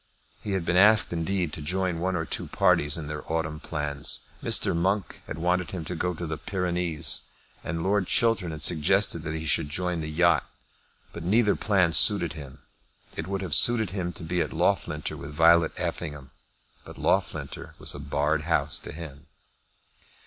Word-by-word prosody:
He 100 - -4
had 95 -3 -2
been 85 - +1
asked 105 0 +6
indeed 85 -1 -1
to 80 - -6
join 90 +2 -1
one 95 +2 -1
or 80 -1 -2
two - - -4
parties 75 +1 +2
in 80 - -5
their 75 0 -5
autumn 80 -1 -2
plans. 75 -2 -1 0.2
Mr. - - +3
Monk 95 +4 -1
had - - -6
wanted 90 +1 0
him 90 -4 -6
to 90 - -4
go 90 +1 -2
to 85 - -5
the 80 -1 -5
Pyrenees, 90 -1 -1 0.4
and 80 0 -3
Lord 100 -1 +1
Chiltern 115 -7 +2
had 80 -2 -7
suggested 90 +4 +2
that 75 0 -5
he 80 0 -5
should 75 0 +1
join 90 +1 -2
the 75 - -5
yacht; 85 +1 +2 0.6
but 85 - -7
neither 105 +4 +3
plan 95 -5 +2
suited 85 -1 +4
him. 70 -3 -11 0.5
It 80 - -5
would 95 0 -3
have 90 -5 -4
suited 110 +1 +4
him 90 -3 -3
to - - -10
be 85 +2 -1
at - - -2
Loughlinter 75 0 -1
with 70 - -8
Violet 80 +1 +4
Effingham, 75 -6 -4 0.5
but - - -12
Loughlinter - - -2
was - - -1
a - - -8
barred 75 +2 -1
house 75 -3 0
to - - -8
him. 75 -3 -10
85 Hz, 180 wpm, -26 LUFS, 75-90 Hz, 0.6 s, asked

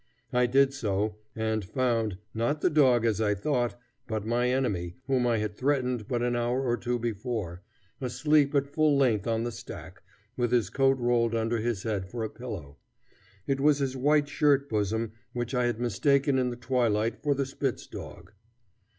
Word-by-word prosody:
I 125 0 +3
did 135 +2 +4
so, 105 -4 -1 0.2
and 110 -1 -1
found, 115 -2 0 0.2
not 120 +7 -1
the - - +2
dog 130 -6 +4
as 110 -1 +1
I 105 -1 +2
thought, 120 +2 -1 0.3
but 110 -2 -3
my 120 +2 +1
enemy 100 -10 -1
whom 130 -2 +1
I 115 -1 +2
had 105 -1 -2
threatened 125 -4 0
but 120 -1 -1
an 120 0 +1
hour 120 +2 0
or 120 -2 +1
two 120 +1 -2
before, 110 -6 -3 0.4
asleep 140 +3 +2
at 140 -1 +3
full 150 0 +2
length 120 -8 +2
on 115 0 0
the 120 - -2
stack, - - -9 0.3
with 120 -2 0
his 120 -3 +2
coat 135 0 +3
rolled 120 -2 +1
under 115 +1 0
his 110 -3 -2
head 100 -5 -2
for 115 +2 -4
a 110 - -4
pillow. 70 +1 -8 0.7
It 135 -1 0
was 145 +1 +4
his 135 -2 -1
white 145 +2 +3
shirt 145 -2 +2
bosom 110 +1 -1 0.2
which 120 0 -3
I 125 -1 +2
had 120 -2 -2
mistaken 135 +4 +2
in 125 -1 +1
the 120 - -4
twilight 120 -3 0
for 145 -1 +1
the 140 0 0
spitz 135 -1 -3
dog. - - -10
120 Hz, 185 wpm, -28 LUFS, 110-135 Hz, 0.7 s, did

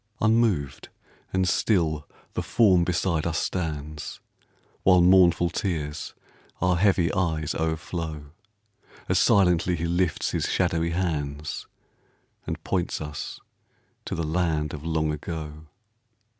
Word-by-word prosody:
Unmoved 110 -11 +1 0.4
and 95 -1 +1
still 80 -7 +1 0.3
the - - -1
form 95 -7 +4
beside 85 -2 0
us 80 -2 -1
stands, 75 -4 -3 0.6
While 90 -1 +5
mournful 90 -2 +5
tears 75 -8 -3 0.4
our 90 0 +2
heavy 90 -2 +3
eyes 80 -5 0
o'erflow, 80 -2 -3 0.8
As - - +2
silently 90 -2 +4
he 85 0 -3
lifts 85 0 0
his - - -1
shadowy 85 -2 +1
hands, 75 -4 -3 0.8
And - - -4
points 90 -3 -1
us 75 -1 -6 0.6
to - - -3
the 85 - -2
land 80 -2 0
of 75 - -7
Long 80 -1 0
Ago. 75 0 -6
85 Hz, 115 wpm, -26 LUFS, 75-90 Hz, 0.8 s, While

